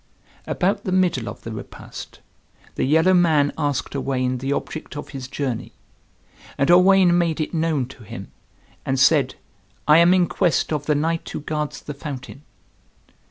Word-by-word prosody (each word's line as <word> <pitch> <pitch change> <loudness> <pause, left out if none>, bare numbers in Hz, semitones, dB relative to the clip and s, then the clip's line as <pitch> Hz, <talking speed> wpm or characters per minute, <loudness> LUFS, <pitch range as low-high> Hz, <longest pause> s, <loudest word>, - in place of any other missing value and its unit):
About 200 +3 0
the 185 - -3
middle 180 -10 +1
of - - -10
the 115 - -6
repast 110 -2 -9 0.5
the - - -1
yellow 160 +6 +4
man 160 -5 +3
asked 145 -2 -2
Owain 130 -2 -1
the 135 +2 -3
object 150 +1 -4
of 145 - -7
his 135 -3 -7
journey. 130 -3 -4 0.8
And 140 +5 +3
Owain 180 0 +6
made 170 -3 +1
it 155 - -2
known 160 -5 0
to 130 - -14
him, 95 - -9 0.5
and 135 0 -1
said, 140 -1 +4 0.5
"I 150 +2 +7
am 170 +1 +6
in 180 -1 +4
quest 175 -3 0
of 150 -1 -3
the 150 - +3
knight 165 +3 -1
who - - -5
guards 150 0 -3
the 150 - -6
fountain." 140 -2 -8
150 Hz, 160 wpm, -22 LUFS, 135-170 Hz, 0.8 s, I